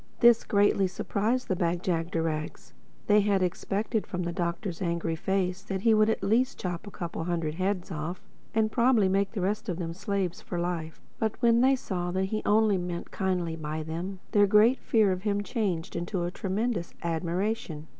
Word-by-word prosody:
This 235 Hz, -1 st, +6 dB
greatly 200 Hz, -1 st, +3 dB
surprised 215 Hz, +6 st, -1 dB
the 185 Hz, -, 0 dB
Bag 175 Hz, 0 st, -1 dB
jagderags. 165 Hz, -3 st, -2 dB, 0.3 s
They 210 Hz, 0 st, +5 dB
had 200 Hz, -2 st, +2 dB
expected 200 Hz, +4 st, -1 dB
from 180 Hz, -1 st, -3 dB
the 170 Hz, -, -2 dB
Doctor's 170 Hz, +1 st, -3 dB
angry 170 Hz, -2 st, -1 dB
face 185 Hz, +1 st, -1 dB
that 195 Hz, -1 st, -4 dB
he 225 Hz, +1 st, +4 dB
would 215 Hz, 0 st, +4 dB
at 220 Hz, -, -1 dB
least 245 Hz, +6 st, +2 dB
chop 180 Hz, +2 st, -4 dB
a -, -, -5 dB
couple 170 Hz, -4 st, -5 dB
of 165 Hz, -, -4 dB
hundred 165 Hz, -3 st, -1 dB
heads 185 Hz, +2 st, -2 dB
off—and 180 Hz, +7 st, -3 dB
probably 235 Hz, -4 st, +4 dB
make 195 Hz, +2 st, +1 dB
the 205 Hz, -, -2 dB
rest 210 Hz, +4 st, -1 dB
of 175 Hz, -, -2 dB
them 165 Hz, -2 st, -3 dB
slaves 195 Hz, -1 st, -2 dB
for 175 Hz, -, -5 dB
life. 170 Hz, -2 st, -3 dB, 0.2 s
But 220 Hz, -2 st, -1 dB
when 235 Hz, -1 st, +4 dB
they 265 Hz, +1 st, +5 dB
saw 180 Hz, -8 st, -3 dB
that 190 Hz, +1 st, +1 dB
he 215 Hz, -, 0 dB
only 210 Hz, -2 st, +4 dB
meant 175 Hz, -1 st, -5 dB
kindly 180 Hz, -4 st, -1 dB
by 155 Hz, 0 st, -4 dB
them, 175 Hz, +5 st, -5 dB
their 205 Hz, -1 st, +5 dB
great 215 Hz, +6 st, +5 dB
fear 215 Hz, -4 st, +3 dB
of 185 Hz, 0 st, -2 dB
him 205 Hz, 0 st, 0 dB
changed 200 Hz, -8 st, -2 dB
to 185 Hz, -3 st, -2 dB
a 175 Hz, -, -2 dB
tremendous 195 Hz, 0 st, -2 dB
admiration. 170 Hz, 0 st, -2 dB
190 Hz, 185 wpm, -28 LUFS, 170-210 Hz, 0.3 s, This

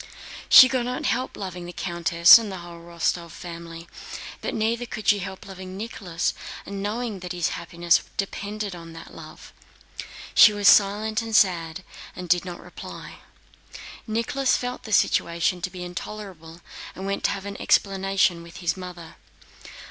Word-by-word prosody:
She 260 Hz, -, +11 dB
could 255 Hz, -2 st, -1 dB
not 250 Hz, +1 st, -3 dB
help 255 Hz, +1 st, -1 dB
loving 180 Hz, -3 st, -6 dB
the -, -, -7 dB
countess 170 Hz, +2 st, +6 dB
and 220 Hz, -3 st, -5 dB
the 190 Hz, -, -6 dB
whole 170 Hz, -1 st, -10 dB
Rostóv 170 Hz, 0 st, -2 dB
family, 170 Hz, 0 st, -9 dB, 0.5 s
but -, -, -3 dB
neither 230 Hz, +2 st, -1 dB
could 215 Hz, -1 st, -7 dB
she 205 Hz, -1 st, +5 dB
help 190 Hz, 0 st, -7 dB
loving 190 Hz, -1 st, -9 dB
Nicholas 195 Hz, -6 st, -3 dB, 0.3 s
and 200 Hz, 0 st, -6 dB
knowing 215 Hz, 0 st, -3 dB
that 180 Hz, 0 st, -6 dB
his 175 Hz, -2 st, 0 dB
happiness 170 Hz, 0 st, +1 dB, 0.2 s
depended 205 Hz, 0 st, -4 dB
on 165 Hz, -1 st, -11 dB
that 165 Hz, 0 st, -11 dB
love. -, -, -12 dB, 0.8 s
She 210 Hz, -, +8 dB
was 205 Hz, -1 st, +1 dB
silent 210 Hz, +2 st, +4 dB
and 225 Hz, -1 st, -4 dB
sad 175 Hz, -3 st, +2 dB, 0.3 s
and 180 Hz, 0 st, -7 dB
did 175 Hz, +1 st, +2 dB
not 175 Hz, -1 st, -7 dB
reply. -, -, -10 dB, 0.9 s
Nicholas 255 Hz, +5 st, +1 dB
felt 250 Hz, 0 st, -5 dB
the 220 Hz, -, -7 dB
situation 170 Hz, -2 st, +2 dB
to 185 Hz, -, -2 dB
be 180 Hz, -1 st, -8 dB
intolerable 180 Hz, -2 st, -8 dB, 0.3 s
and 190 Hz, -, -7 dB
went 195 Hz, 0 st, -3 dB
to -, -, +4 dB
have 195 Hz, -, -10 dB
an 200 Hz, 0 st, -7 dB
explanation 195 Hz, -3 st, +2 dB
with 170 Hz, -1 st, -12 dB
his 175 Hz, -, -1 dB
mother. 180 Hz, -3 st, -10 dB
190 Hz, 160 wpm, -24 LUFS, 170-210 Hz, 0.9 s, She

